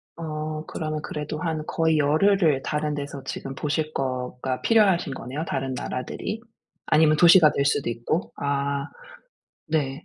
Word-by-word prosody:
어 155 -1 -4
그러면 155 -1 -4
그래도 150 0 -5
한 160 -2 -2
거의 160 -1 +2
열흘을 155 0 +3
다른 150 0 -1
데서 140 -1 -6
지금 135 0 -5
보실 155 +2 -2
거가 130 0 -3
필요하신 195 -10 +3
거네요, 135 +5 -5
다른 135 -2 -2
나라들이? 130 - -4 0.5
아니면 155 0 +4
도시가 170 -1 +7
될 140 - 0
수도 140 -3 +1
있고. 120 +8 -2
아. 140 0 -1 0.8
네. 145 -3 -1
150 Hz, 295 characters per minute, -25 LUFS, 140-160 Hz, 0.8 s, 도시가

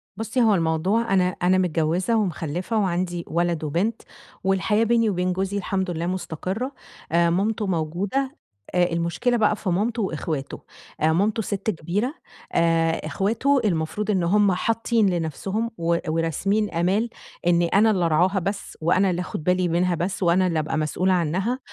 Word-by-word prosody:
بُصّي، 225 +4 -1
هو 220 -3 +5
الموضوع 185 +6 +1
أنا 180 -1 +3
أنا 185 +1 +4
متجوزة 175 +4 +1
ومخَلَّفة 180 +1 -2
وعندي 175 -3 -1
ولد 170 -1 0
وبنت، 180 +10 -1 0.4
والحياة 195 +3 +2
بيني 230 -1 +3
وبين 180 -1 0
جوزي 190 +2 -2
الحمد 190 -1 -2
لله 165 0 -3
مستقرة. 185 - -3 0.4
آآ، 170 0 +3
مامتُه 210 +4 0
موجودة، 190 - -2 0.4
آآ، 180 0 +4
المشكلة 170 +9 0
بقى 215 -2 +3
في 195 - -4
مامتُه 220 +6 0
وإخواتُه. 155 -6 -3 0.4
آآ، 160 +1 +3
مامتُه 210 +6 +1
ست 200 0 -3
كبيرة، 205 - -2 0.4
آآ، 165 -1 +3
إخواتُه 230 - +1
المفروض 200 +3 -1
إن 190 -4 +1
هُم 200 +3 +3
حاطين 225 +2 +1
لنفسُهُم 190 +7 -2
و 170 0 +1
وراسمين 165 +6 0
آمال 190 +7 0 0.4
إن 175 0 +4
أنا 200 +6 +4
اللي 185 -4 +1
أرعاها 180 +5 +2
بس، 195 +3 -4
وأنا 185 +4 +3
اللي 180 0 -1
آخد 165 - -5
بالي 180 +1 +2
منَها 175 +1 +1
بس، 185 +4 -2
وأنا 180 +2 +3
اللي 165 -3 0
أبقى 155 0 -2
مسؤولة 180 +5 +1
عنّها. 185 - 0
185 Hz, 155 wpm, -24 LUFS, 170-210 Hz, 0.4 s, هو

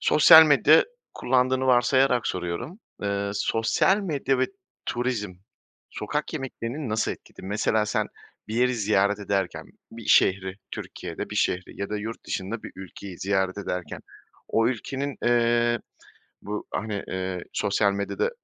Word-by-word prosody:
sosyal 160 +1 +8
medya 150 +1 +6 0.3
kullandığını 130 +1 +1
varsayarak 125 0 +3
soruyorum. 90 - -4 0.2
Eee, 100 0 -1
sosyal 115 - +2
medya 140 -8 -1
ve 130 - +2 0.4
turizm 120 -5 -2 0.6
sokak 150 +8 -3
yemeklerini 135 -1 -5
nasıl 110 +1 0
etkiledi? - - -14
Mesela 105 +1 +1
sen - - 0 0.4
bir 110 - -4
yeri 125 +1 +2
ziyaret 105 -2 +2
ederken, 100 -2 -2 0.3
bir 115 -1 -10
şehri 95 0 +3
Türkiye'de, - - -6
bir - - -4
şehri 90 +2 -1
ya 100 - -3
da 105 - -1
yurt 110 +2 -6
dışında 100 +4 -4
bir - - -9
ülkeyi 95 -1 -9
ziyaret 95 0 0
ederken, 90 -5 -4 0.5
o 115 +1 +2
ülkenin, 135 +3 -3
eee, 120 0 +3 0.6
bu, 105 +1 -5
hani, 105 -2 -3
eee, 95 -1 -3
sosyal 100 0 +2
medyada, 100 - -1
110 Hz, 135 wpm, -25 LUFS, 100-130 Hz, 0.6 s, sosyal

